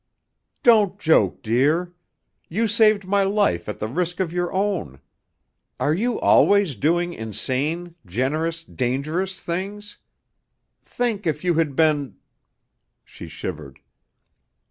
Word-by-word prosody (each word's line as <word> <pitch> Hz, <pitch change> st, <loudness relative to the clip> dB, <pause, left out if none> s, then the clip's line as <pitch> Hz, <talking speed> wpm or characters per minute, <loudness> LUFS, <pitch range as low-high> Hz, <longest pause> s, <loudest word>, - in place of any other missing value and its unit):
"Don't 210 Hz, -5 st, +5 dB
joke, 160 Hz, 0 st, +2 dB
dear. 150 Hz, +10 st, +1 dB, 0.6 s
You 220 Hz, +8 st, 0 dB
saved 215 Hz, -2 st, +3 dB
my 200 Hz, +1 st, +2 dB
life 195 Hz, -, +1 dB
at 105 Hz, -, -4 dB
the 110 Hz, -, -3 dB
risk 175 Hz, -, -2 dB
of 175 Hz, -3 st, -1 dB
your 175 Hz, 0 st, -1 dB
own. 190 Hz, -, -2 dB, 0.8 s
Are 150 Hz, -, +1 dB
you 230 Hz, +7 st, -1 dB
always 200 Hz, -8 st, +4 dB
doing 175 Hz, -, 0 dB
insane, 145 Hz, -, -3 dB
generous, 155 Hz, -, -2 dB
dangerous 155 Hz, +10 st, -2 dB
things? 200 Hz, +4 st, -5 dB, 0.8 s
Think 225 Hz, -6 st, -2 dB
if 150 Hz, 0 st, -1 dB
you 180 Hz, -1 st, +2 dB
had 160 Hz, -4 st, 0 dB
been 150 Hz, -3 st, +1 dB, 0.4 s
" -, -, -53 dB
She -, -, -9 dB
shivered. 75 Hz, -6 st, -7 dB
170 Hz, 120 wpm, -22 LUFS, 140-195 Hz, 0.8 s, Don't